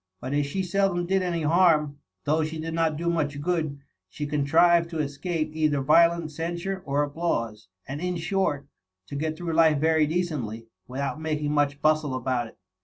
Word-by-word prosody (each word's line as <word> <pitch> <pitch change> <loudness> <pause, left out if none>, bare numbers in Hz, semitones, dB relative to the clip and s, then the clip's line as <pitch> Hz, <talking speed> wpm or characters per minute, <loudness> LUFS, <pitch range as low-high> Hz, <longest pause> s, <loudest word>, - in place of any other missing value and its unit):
But 130 +6 -5
as 145 0 +1
she 190 +7 -2
seldom 185 -1 +1
did 190 +2 +1
any 170 -3 -1
harm, 155 -3 +3 0.2
though 155 +2 +1
she 160 +1 -4
did 160 +1 -4
not 165 -2 +1
do 170 +2 -3
much 150 -4 0
good, 155 -2 -1 0.3
she 150 - -5
contrived 165 +4 +3
to 165 - -5
escape 155 +2 -2
either 155 -2 +1
violent 170 +2 +4
censure 170 +4 -4
or 140 +1 +1
applause; 130 - -2 0.2
and 140 +3 -5
in 180 0 -1
short, 165 -5 -1 0.4
to - - -6
get 155 +2 -2
through 170 -1 -3
life 160 -2 +5
very 160 +1 +3
decently, 145 -10 -2 0.2
without 140 +4 -4
making 150 -2 -1
much 145 -1 0
bjistle 155 -3 +2
about 125 -1 -1
it. - - -17
155 Hz, 180 wpm, -26 LUFS, 145-170 Hz, 0.4 s, life